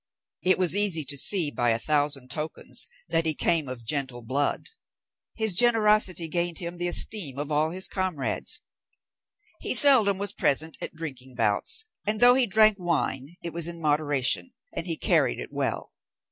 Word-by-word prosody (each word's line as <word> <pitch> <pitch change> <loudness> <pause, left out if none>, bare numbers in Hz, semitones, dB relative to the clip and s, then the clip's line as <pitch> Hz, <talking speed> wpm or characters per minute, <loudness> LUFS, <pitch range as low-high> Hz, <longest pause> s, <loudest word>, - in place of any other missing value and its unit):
It 185 - +2
was 180 -2 +2
easy 200 -6 +2
to 140 +1 -1
see 160 +2 +3
by 120 -3 0
a 115 - +2
thousand 145 -1 -1
tokens 155 +1 -3 0.2
that 165 0 +1
he 155 - 0
came 165 -2 0
of 125 -2 -8
gentle 130 -2 -3
blood. 140 - -2 0.7
His 220 -3 0
generosity 210 -5 +4
gained 170 0 -1
him 175 0 -5
the 175 0 -1
esteem 175 -6 +1
of 145 +1 -4
all 150 +1 +1
his 185 +2 -1
comrades. 185 -9 -2 1.0
He - - -1
seldom 235 -9 +6
was 200 0 -3
present 160 0 0
at - - -6
drinking 130 -5 -9
bouts; 115 - -1 0.2
and 210 +1 -2
though 245 +1 +7
he 255 -1 +2
drank 215 0 +4
wine, 165 -3 -3
it 170 - -5
was 170 -1 -1
in 170 -1 -7
moderation, 145 - 0 0.2
and 170 - -4
he 165 -2 -3
carried - - +1
it - - -7
well. - - -3
165 Hz, 170 wpm, -25 LUFS, 145-190 Hz, 1.0 s, though